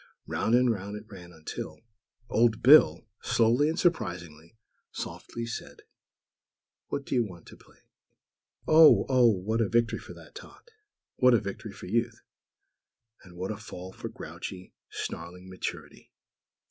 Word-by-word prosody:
Round 115 - +1
and 125 -1 +4
round 100 -1 -5
it 105 +1 -9
ran, 90 -5 -12
until, 80 -2 -7 0.3
(!!) - - -61
Old 115 0 +2
Bill, 145 +5 +7 0.2
slowly 120 +6 +3
and 165 - -3
surprisingly 90 - -2 0.3
softly, 115 0 -6
said: 120 - -8 1.0
"What 140 - -4
do - - -5
you 125 -2 +3
want 90 -6 -10
to - - -13
play?" - - -22 0.9
Oh! 155 0 +7
Oh! 130 -2 +5
what 110 +3 -1
a 110 - +1
victory 115 0 +1
for - - -11
that - - -15
tot!! - - -14 0.5
What 125 -1 +5
a - - +3
victory 100 +2 -7
for - - -11
Youth!! 115 +3 -1 1.0
And 90 -2 -15
what 95 +3 -3
a 105 - -5
fall 95 -3 -9
for - - -7
grouchy, 90 -1 -9 0.2
snarling 90 +3 -7
Maturity!! 90 - -7
110 Hz, 145 wpm, -28 LUFS, 90-120 Hz, 1.0 s, Bill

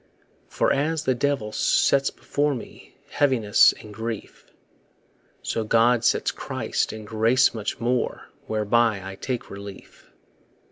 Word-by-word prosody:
For - - +1
as 155 +3 -1
the 130 - +2
devil 125 -4 -1
sets 135 +5 +2
before 145 -1 -1
Me 120 - -11 0.2
heaviness 125 -8 +4
and 105 - -12
grief, 110 0 -7 1.0
So 115 - -2
God 115 +2 +3
sets - - +2
Christ - - -3
and 110 -1 -8
grace 115 +4 +3
much 110 -2 -4
more, 120 +2 -1 0.2
Whereby 110 -1 +1
I 95 - -6
take 125 +5 -5
relief. 100 0 -11
115 Hz, 125 wpm, -24 LUFS, 105-130 Hz, 1.0 s, heaviness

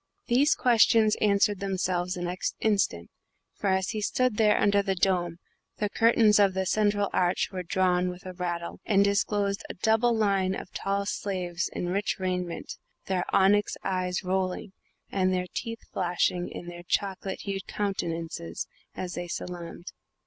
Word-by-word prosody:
These 270 +5 +4
questions 225 -2 +4
answered 200 -1 +2
themselves 185 -2 -1
the 175 - -4
next 180 +1 -2
instant, 195 - 0 0.4
for, 205 - -4
as 190 0 +1
he 215 - -2
stood 250 +1 +1
there 215 -2 +4
under 200 0 +4
the 195 -1 -1
dome, 175 -2 +1 0.4
the 210 -1 -1
curtains 225 -2 +5
of 195 -2 +4
the 190 0 0
central 205 0 +1
arch 180 0 +1
were 185 -2 -4
drawn 180 0 +1
with 180 +1 -9
a 185 - -6
rattle, 175 -1 -4
and 200 -2 +4
disclosed 200 0 +1
a - - -6
double 225 +4 +2
line 195 -3 +2
of - - -8
tall 200 0 -1
slaves 185 -3 -2
in 175 - -3
rich 200 +3 0
raiment, 180 -2 -3 0.3
their 185 -2 -1
onyx 205 +2 +3
eyes 185 -1 -1
rolling 185 +1 -1 0.4
and 185 -1 +2
their 180 -1 0
teeth 230 0 -5
flashing 175 0 0
in - - -8
their 175 0 -8
chocolate 190 0 -2
hued 195 -2 -4
countenances, 165 - -3 0.3
as 180 -1 -4
they 175 0 -4
salaamed. 175 0 -6
190 Hz, 155 wpm, -27 LUFS, 180-205 Hz, 0.4 s, curtains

